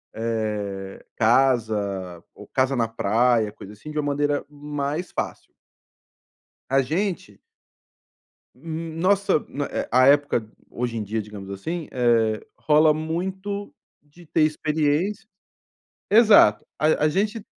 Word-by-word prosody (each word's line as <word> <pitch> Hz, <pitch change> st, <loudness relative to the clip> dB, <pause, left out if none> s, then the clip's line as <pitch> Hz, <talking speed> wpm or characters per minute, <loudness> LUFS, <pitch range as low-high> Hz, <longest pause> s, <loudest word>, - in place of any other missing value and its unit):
eh, 105 Hz, -4 st, -3 dB
casa, 110 Hz, -7 st, +1 dB
ou -, -, -13 dB
casa 130 Hz, +1 st, +1 dB
na 115 Hz, -3 st, +1 dB
praia, 115 Hz, 0 st, +1 dB
coisa 105 Hz, 0 st, -12 dB
assim, 150 Hz, +9 st, -10 dB
de 155 Hz, -, -7 dB
uma 145 Hz, -, -1 dB
maneira 145 Hz, 0 st, 0 dB
mais 145 Hz, +3 st, -4 dB
fácil. -, -, -5 dB, 1.2 s
A 135 Hz, 0 st, +3 dB
gente 165 Hz, -, -3 dB, 1.2 s
Hum, 160 Hz, +3 st, -6 dB
nossa 195 Hz, -1 st, +2 dB
né, 140 Hz, 0 st, -3 dB
é, -, -, -4 dB
a 130 Hz, +2 st, +5 dB
época 140 Hz, -6 st, +3 dB, 0.2 s
hoje 120 Hz, -1 st, -3 dB
em 110 Hz, -, -2 dB
dia, 110 Hz, +2 st, -2 dB
digamos 100 Hz, -2 st, -10 dB
assim, 160 Hz, -, -5 dB
eh, 115 Hz, -3 st, +2 dB, 0.2 s
rola 155 Hz, 0 st, +4 dB
muito 190 Hz, +6 st, -4 dB, 0.3 s
de 150 Hz, +4 st, -19 dB
ter 155 Hz, -, +1 dB
experiência 155 Hz, +7 st, 0 dB, 0.8 s
Exato, 210 Hz, -, +6 dB
a 155 Hz, 0 st, +2 dB
a -, -, +5 dB
gente 210 Hz, +6 st, -1 dB
140 Hz, 125 wpm, -23 LUFS, 110-160 Hz, 1.2 s, Exato